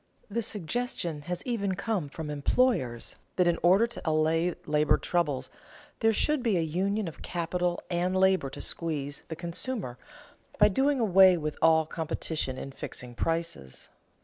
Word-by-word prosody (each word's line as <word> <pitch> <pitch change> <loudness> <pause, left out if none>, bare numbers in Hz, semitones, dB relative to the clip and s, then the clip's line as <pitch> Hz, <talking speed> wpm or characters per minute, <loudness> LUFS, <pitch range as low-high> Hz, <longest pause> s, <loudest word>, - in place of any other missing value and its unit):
The 235 +3 0
suggestion 205 -5 -2
has 180 -1 -3
even 200 -6 -1
come 200 -6 -2
from 150 +1 -6
employers 145 - +1 0.2
that 180 - +3
in 170 -1 +2
order 190 +6 +5
to 235 - -8
allay 160 +2 +1
labor 150 0 +3
troubles 145 -7 -1 0.5
there 225 -1 +4
should 295 +6 +1
be 225 -6 +2
a - - +2
union 190 +6 -1
of 165 - -8
capital 175 0 -1
and 180 +2 0
labor 190 -6 +3
to - - -8
squeeze 145 -4 -3
the 160 - -5
consumer, 170 - -4 0.6
by 210 0 +6
doing 270 +6 +2
away 190 -4 +6
with 155 -2 -3
all 160 -1 +5
competition 160 -4 -3
in 135 - -6
fixing 125 -2 -7
prices. 165 - -3
175 Hz, 150 wpm, -29 LUFS, 155-200 Hz, 0.6 s, by